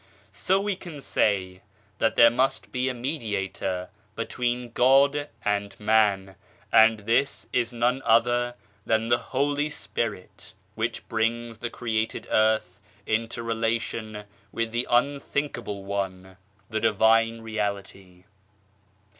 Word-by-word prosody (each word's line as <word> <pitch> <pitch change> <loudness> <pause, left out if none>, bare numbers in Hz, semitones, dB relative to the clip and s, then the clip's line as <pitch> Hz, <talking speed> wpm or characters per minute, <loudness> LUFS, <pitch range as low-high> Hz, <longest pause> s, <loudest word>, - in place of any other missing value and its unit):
So 190 +1 +1
we 200 0 -1
can 175 -5 -9
say 95 -7 0 0.4
that 115 - +2
there 115 0 +7
must 130 +3 0
be 130 +1 0
a - - -2
Mediator 100 - -3 0.3
between 120 +1 -2
God 140 +4 +4 0.2
and 100 -1 -1
Man, 105 -3 +2 0.4
and 110 -1 +6
this 115 +6 0
is 120 -1 +1
none 120 +2 0
other 120 +1 +2 0.3
than 110 +1 +1
the 120 - +4
Holy 145 +2 -1
Spirit, 115 -12 -5 0.2
which 115 +1 -3
brings 115 0 -1
the 120 - -3
created 110 -2 -2
earth 110 -4 +2 0.3
into 115 +1 -1
relation 115 -1 -2 0.3
with 115 -1 -2
the 120 +2 -1
" - - -17
Unthinkable 125 -5 -1
One," 95 -2 -4 0.3
the 110 +2 -2
Divine 115 +2 +3
Reality. 100 -4 -5
115 Hz, 120 wpm, -26 LUFS, 105-120 Hz, 0.4 s, there